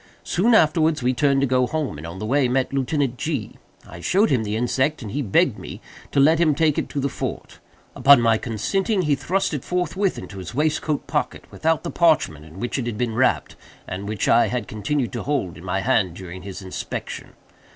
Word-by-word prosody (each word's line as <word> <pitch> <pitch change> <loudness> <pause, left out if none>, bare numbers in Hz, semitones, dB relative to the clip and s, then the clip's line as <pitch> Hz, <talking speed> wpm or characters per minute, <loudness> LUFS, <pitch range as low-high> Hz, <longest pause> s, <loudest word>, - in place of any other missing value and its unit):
Soon 220 +7 +2
afterwards 155 - +3
we 125 +1 +2
turned 140 +1 +2
to - - +3
go 125 -1 +2
home, 150 - -3
and 80 - -7
on 85 +3 -8
the 105 - -5
way 135 +3 +2
met 130 +2 0
Lieutenant 135 -1 0
G——. 145 -9 -3 0.3
I 85 - -10
showed 195 - +2
him 125 -5 +2
the 105 0 -2
insect, 130 +5 0
and 105 - -6
he 145 - -2
begged 105 -8 +2
me - - -8 0.3
to 140 - +1
let 155 +4 +5
him 155 -4 +3
take 155 -1 +2
it - - -4
to 145 - -3
the 140 - 0
fort. - - -6 0.4
Upon 140 +1 +7
my 115 -2 +3
consenting, 190 - -1
he 150 -2 +2
thrust 170 +8 -1
it 145 - -3
forthwith 180 +2 -1
into 100 - -8
his 95 +5 -8
waistcoat 150 0 0
pocket, - - -2
without 160 0 0
the 170 - -4
parchment 150 - +2
in 80 +4 -12
which 120 +4 -2
it 120 - -3
had 115 -3 -3
been 120 -1 -1
wrapped, 125 +3 +1 0.3
and 100 +3 -5
which 105 -3 -2
I 120 - +5
had 120 -5 -3
continued 120 +6 -2
to 120 - -3
hold 135 - -2
in 85 - -12
my 95 +1 -1
hand 105 -9 +1
during 90 -1 -8
his 100 +1 -8
inspection. 95 - -6
130 Hz, 215 wpm, -22 LUFS, 110-155 Hz, 0.4 s, Upon